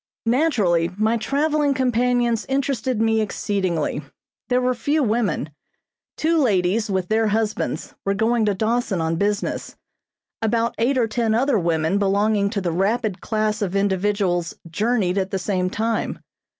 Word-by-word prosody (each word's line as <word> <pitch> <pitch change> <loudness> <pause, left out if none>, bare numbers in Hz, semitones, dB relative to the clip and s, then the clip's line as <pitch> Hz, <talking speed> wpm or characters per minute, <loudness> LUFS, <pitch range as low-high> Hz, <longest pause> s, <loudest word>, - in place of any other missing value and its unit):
Naturally, 225 - +2
my 220 +2 +2
traveling 285 +4 +1
companions 245 -2 +1
interested 260 -3 -1
me 225 0 +2
exceedingly. 190 -8 -1 0.5
There 250 0 +3
were 255 0 +1
few 290 +5 0
women. 215 - 0 0.7
Two 325 +1 +2
ladies 210 -3 +1
with 190 -2 -1
their 220 0 +2
husbands 215 0 -2
were 195 0 0
going 225 +2 +2
to 205 -2 +1
Dawson 220 -2 0
on 165 0 0
business. 205 +2 -2 0.7
About 230 +1 +1
eight 255 +4 +2
or 235 -3 +2
ten 220 0 0
other 255 -1 +2
women 165 +2 +1
belonging 200 +1 +2
to 200 -2 -2
the 175 -2 -1
rapid 200 +2 0
class 215 -1 -1
of 195 -2 -2
individuals 195 -3 0
journeyed 200 +1 0
at 190 0 -2
the 195 - -2
same 185 -1 -1
time. 225 +4 -1
215 Hz, 145 wpm, -22 LUFS, 195-240 Hz, 0.7 s, There